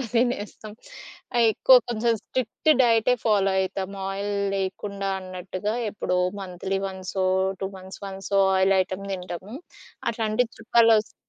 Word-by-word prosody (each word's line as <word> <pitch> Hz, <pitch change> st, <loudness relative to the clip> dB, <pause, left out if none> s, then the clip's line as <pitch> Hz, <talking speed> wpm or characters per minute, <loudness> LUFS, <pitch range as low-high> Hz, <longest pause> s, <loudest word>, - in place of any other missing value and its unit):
కూడా 260 Hz, -, -3 dB
తినేస్తాం. 220 Hz, -3 st, -1 dB, 0.8 s
ఎక్కువ 255 Hz, +4 st, +6 dB
కొంచెం 230 Hz, 0 st, +1 dB
స్ట్రిక్ట్ 255 Hz, +5 st, -3 dB
డైటే 230 Hz, +1 st, +4 dB
ఫాలో 200 Hz, -3 st, +3 dB
అయితాం. 190 Hz, 0 st, -3 dB, 0.2 s
ఆయిల్ 200 Hz, +1 st, -3 dB, 0.3 s
లేకుండా 195 Hz, +1 st, -3 dB
అన్నట్టుగా 185 Hz, +3 st, -4 dB, 0.2 s
ఎప్పుడో 180 Hz, -3 st, -2 dB, 0.2 s
మంత్లీ 190 Hz, +1 st, -3 dB
వన్సో, 190 Hz, 0 st, -3 dB, 0.4 s
2 190 Hz, -, -1 dB
మంత్స్ 190 Hz, +1 st, -11 dB
వన్సో 195 Hz, 0 st, -1 dB, 0.2 s
ఆయిల్ 190 Hz, +1 st, +4 dB
ఐటెమ్ 190 Hz, +2 st, -6 dB
తింటాము. 185 Hz, +4 st, -6 dB, 0.6 s
అట్లాంటి 220 Hz, +1 st, 0 dB
చుట్టాలొస్తే 225 Hz, -1 st, +3 dB
200 Hz, 115 wpm, -25 LUFS, 190-225 Hz, 0.8 s, ఎక్కువ